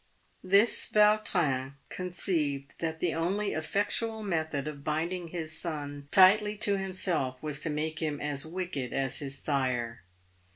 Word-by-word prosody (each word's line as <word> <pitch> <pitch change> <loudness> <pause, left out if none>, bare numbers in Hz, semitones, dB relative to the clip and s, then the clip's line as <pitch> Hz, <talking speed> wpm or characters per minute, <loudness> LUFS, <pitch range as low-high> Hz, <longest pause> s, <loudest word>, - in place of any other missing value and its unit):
This 200 +5 +4
Vautrin 180 -11 +2
conceived 165 -6 -2
that 160 -1 -3
the 175 - +1
only 195 +6 0
effectual 210 +7 -1
method 160 -6 -2
of 145 -2 -7
binding 170 +4 -2
his 160 -2 -4
son 145 -4 -4
tightly 210 +4 +5
to 205 -1 +3
himself 180 -9 -1
was 150 -2 -3
to 165 - -2
make 155 +1 -2
him 150 -3 -2
as 145 -1 -2
wicked 160 -7 -4
as 135 -2 -1
his 140 -1 -4
sire. 125 - -1
160 Hz, 135 wpm, -29 LUFS, 145-185 Hz, -, tightly